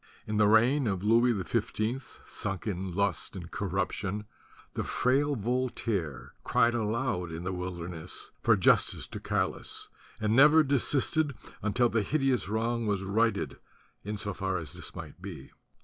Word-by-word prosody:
In 105 0 -2
the 105 -1 +5
reign 120 +5 +4
of 95 -2 -1
Louis 115 +3 +5
XV, 115 +4 -2
sunk 95 -4 -4
in 95 -3 -3
lust 100 -3 0
and 85 -3 -8
corruption, 100 +1 -2 0.5
the - - -2
frail 140 +3 +2
Voltaire 110 - -2
cried 120 0 +3
aloud 110 -6 -1
in 80 +1 -5
the 90 +1 -2
wilderness 90 -2 -5
for - - +4
justice - - +3
to - - -7
Galas - - -2 0.3
and 110 0 +1
never 150 +4 +7
desisted 140 +1 +1 0.3
until 115 +3 +2
the 115 -1 +1
hideous 135 -1 +1
wrong 115 +1 0
was 100 -2 0
righted 110 +4 0 0.4
in 105 +1 -4
so 100 0 -3
far 95 0 -1
as 80 -5 -5
this - - -5
might - - -9
be. - - -8
110 Hz, 150 wpm, -29 LUFS, 95-120 Hz, 0.5 s, never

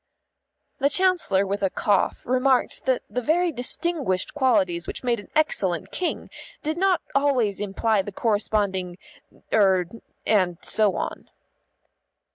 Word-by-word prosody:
The 280 - +3
Chancellor 340 - +2
with 200 +1 -3
a 195 - +2
cough 200 +1 0
remarked 255 +1 +1
that 260 -1 +1
the 250 - -3
very 340 +7 +1
distinguished 255 - -1
qualities 190 -11 +1
which - - -6
made 240 -2 +1
an 205 - -12
excellent 190 - 0
King 365 - -3 0.3
did 310 +1 -1
not 370 0 +2
always 260 -8 +1
imply 205 +1 0
the 205 - -7
corresponding 200 -4 -1 0.6
er 190 -4 +4 0.4
and 185 -5 +2
so 210 -2 +1
on. - - -5
220 Hz, 125 wpm, -24 LUFS, 195-280 Hz, 0.6 s, er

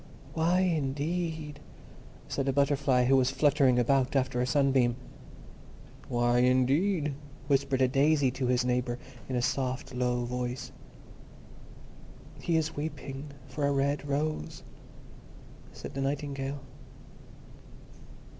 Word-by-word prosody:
"Why, 170 +3 +2
indeed?" 155 -1 -1 0.7
said 135 - -2
a - - +3
Butterfly, 140 -2 +2
who 135 +2 +4
was 130 -1 +3
fluttering 140 -2 +3
about 130 +2 +2
after 130 -2 +1
a 125 - 0
sunbeam. 130 -3 +3 1.1
"Why, 120 0 +2
indeed?" 140 +6 +2 0.3
whispered 135 -1 +2
a - - +5
Daisy 140 0 +3
to 130 0 -2
his 125 0 +2
neighbour, 125 -1 0 0.3
in 130 - -1
a 120 - 0
soft, 130 0 -2
low 125 -1 0
voice. 125 +1 -4 1.7
"He 165 -1 +1
is 160 0 -1
weeping 145 -2 -5 0.2
for 140 +3 -4
a - - +1
red 140 +1 0
rose," 145 - -2 1.1
said - - -9
the 135 - -3
Nightingale. 140 0 -3
135 Hz, 115 wpm, -29 LUFS, 125-145 Hz, 1.7 s, a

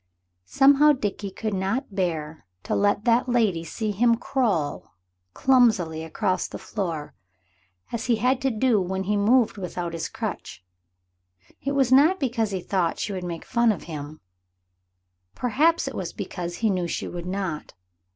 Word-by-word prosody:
Somehow 285 - +5
Dickie 205 -5 -3
could 215 +2 -4
not 195 +5 -2
bear 160 - -3 0.2
to - - -3
let 205 +1 +1
that 240 +2 +3
lady 215 -9 +2
see 215 +5 -3
him 230 +3 +3
crawl 225 - -1 0.4
clumsily 220 -12 +3
across 185 +3 -1
the - - -7
floor, 170 -8 -4 0.8
as 230 -1 -3
he 240 - +4
had 250 +4 +1
to 270 - +2
do 225 -2 +2
when 190 +1 -2
he 210 +2 0
moved 220 +3 +3
without 175 -2 -4
his 165 -1 -4
crutch. 90 - -6 1.0
It 280 - -1
was 265 -3 +2
not 300 +8 +5
because 235 -6 0
he 190 -2 -3
thought 175 -3 0
she 205 - -3
would 185 -1 -4
make 170 -2 -5
fun 235 -2 +3
of 200 - -4
him; 155 -1 -8 1.1
perhaps 305 +7 +2
it - - -4
was - - -5
because 175 -2 -5
he 220 -2 +1
knew 180 -2 -1
she - - -3
would 175 0 -6
not. 185 -5 -4
205 Hz, 160 wpm, -25 LUFS, 175-245 Hz, 1.1 s, Somehow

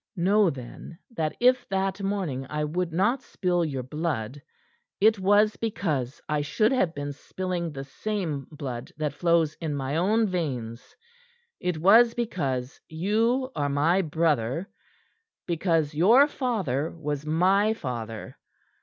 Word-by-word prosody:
"Know, 195 +2 +3
then, 135 +4 -9
that 160 -9 -2
if 250 0 +3
that 195 +1 -1
morning 185 -10 -2
I 150 0 -2
would 170 +3 -2
not 210 +10 +1
spill 180 -6 -1
your 135 -5 -3
blood, 140 -3 -3 0.6
it 215 0 +4
was 205 +2 +3
because 160 - -2
I 150 -1 0
should 215 - +1
have 185 -11 +1
been 145 0 -4
spilling 175 +2 -4
the 135 -2 -6
same 155 -2 -4
blood 135 -6 -6
that 150 -2 -2
flows 165 -1 +2
in 155 -3 -2
my 140 +2 -2
own 215 +6 +3
veins; 130 - -4 0.6
it 180 -2 -1
was 225 +8 +6
because 140 - -3
you 225 +10 0
are 145 -1 0
my 160 +7 +2
brother; 155 - 0 0.8
because 165 -3 0
your 220 - +6
father 190 - -1
was 150 -3 -4
my 190 +7 +2
father. 115 - -6
165 Hz, 135 wpm, -26 LUFS, 145-200 Hz, 0.8 s, was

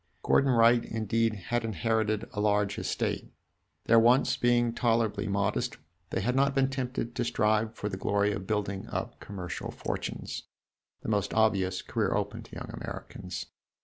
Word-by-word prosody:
Gordon 140 - +4
Wright, 115 0 +5
indeed, 115 0 0
had 115 +4 -2
inherited 110 +1 0
a 105 - -2
large 105 -1 +2
estate. - - -2 0.5
Their 115 0 +6
wants 125 +2 +4
being 120 -1 +2
tolerably 115 -3 +1
modest, 100 +4 0 0.3
they - - -1
had 125 +1 0
not 140 +1 +3
been 135 -1 +3
tempted 125 -3 -3
to 120 - -1
strive 110 -1 +1
for 105 - -3
the 95 -2 -3
glory 100 +1 +1
of 100 -2 -4
building 100 -2 -2
up - - -4
commercial 90 -4 -6
fortunes - - -4 0.6
the - - -5
most 105 -2 0
obvious 95 -4 +2
career - - 0
open - - -2
to - - -12
young - - -6
Americans. 90 -3 -6
110 Hz, 155 wpm, -29 LUFS, 100-120 Hz, 0.6 s, Their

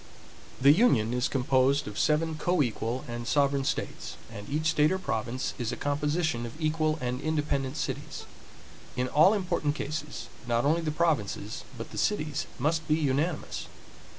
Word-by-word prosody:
The 140 +2 +7
union 135 - +4
is 125 +1 +1
composed 135 +1 +2
of 105 - -5
seven 160 +1 +2
coequal 130 -6 0
and 120 0 -5
sovereign 140 -1 +2
states, - - -3
and 105 -3 -8
each 155 +2 -1
state 155 0 +3
or 190 - +1
province 125 -6 -2
is 120 -1 -1
a - - -4
composition 145 -2 0
of 120 +6 -7
equal 155 0 +1
and 125 0 -2
independent 145 -2 -1
cities. - - -4 0.7
In 125 0 0
all 155 +10 +5
important 175 -7 0
cases, 150 0 -4 0.2
not 120 +1 +1
only 160 +4 +3
the 160 - -1
provinces 145 -9 -1
but 115 - -7
the - - -4
cities 150 -9 0
must 160 +1 0
be 155 - +4
unanimous. 150 +2 -1
145 Hz, 155 wpm, -28 LUFS, 125-155 Hz, 0.7 s, The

